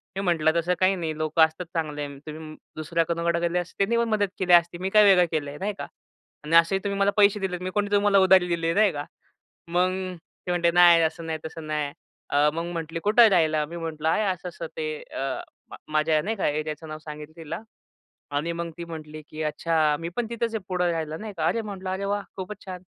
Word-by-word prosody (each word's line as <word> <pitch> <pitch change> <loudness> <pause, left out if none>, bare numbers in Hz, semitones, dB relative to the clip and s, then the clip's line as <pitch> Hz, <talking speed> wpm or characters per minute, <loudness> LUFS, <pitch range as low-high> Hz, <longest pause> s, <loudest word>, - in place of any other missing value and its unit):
मी 195 - -2
म्हटलं, 165 -4 +2
"तसं 175 +2 0
काही 190 +1 +4
नाही 160 -3 -4
लोकं 155 +1 +1
असतात 160 +3 -7
चांगले. 150 -3 -2 0.2
तुम्ही 155 0 -8 0.2
दुसऱ्या 165 +2 0
कुणाकडे 170 0 0
गेले 170 +1 0
असते 175 0 -7
त्यांनी 235 +4 +1
पण 235 -1 +1
मदत 205 -2 +2
केली 180 -2 +3
असती. 175 0 +5
मी 190 +2 -2
काय 210 +1 +6
वेगळं 190 -3 +6
केलं 150 -3 -1
आहे, 145 - -8
नाही 205 +2 -2
का? - - -6 0.6
आणि 160 +2 0
असेही 170 +3 +5
तुम्ही 200 -1 -2
मला 200 0 +3
पैसे 205 0 +5
दिलेत, 180 -2 -2
मी 185 - -3
कोणी 205 +1 -1
तुम्हाला 205 -1 +4
उधारी 190 -1 +5
दिली 170 -1 -1
आहे, 165 - +2
नाही 210 -1 +4
का." 145 0 -5 0.6
मग 180 +2 +2 0.6
ती - - -2
म्हणते, 175 -1 +2
"नाही, 175 -1 +7
असं 160 +1 -1
नाही, 160 -1 -3
तसं 160 0 -8
नाही." 150 -2 -2 0.4
अ, 145 +1 +4
मग 165 +1 -2
म्हटली, 165 0 -4
"कुठं 215 +3 +6
आहे 225 - +7
राहायला?" 155 -4 +3
मी 170 +3 -8
म्हटलं, 160 -2 -3
"आहे 190 - +2
असं-असं 170 -1 -7
ते" 155 - -2 0.3
अ, 135 -1 -3 0.3
म - - -9 0.2
माझ्या, 155 0 +2
नाही 220 +5 -2
का, 190 - 0
एरियाचं 155 +1 -4
नाव 155 0 -6
सांगितलं 150 0 -9
तिला 165 +3 -6 0.8
आणि 160 +4 0
मग 170 0 -4
ती 170 - -5
म्हटली 155 -2 -8
की 155 - -7
"अच्छा. 155 0 +1
मी 165 +1 -4
पण 240 - -1
तिथंच 235 -1 -2
आहे 210 - -3
पुढं 180 -1 0
राहायला." 160 -1 -3
नाही 215 -1 -7
का. 160 - 0
"अरे," 230 - +1
म्हटलं, 195 -3 -6
"अरे, 190 +1 -3
वाह! 205 +1 -1 0.2
खूपच 190 +2 -6
छान!" 185 -1 -7
170 Hz, 225 wpm, -25 LUFS, 155-190 Hz, 0.8 s, नाही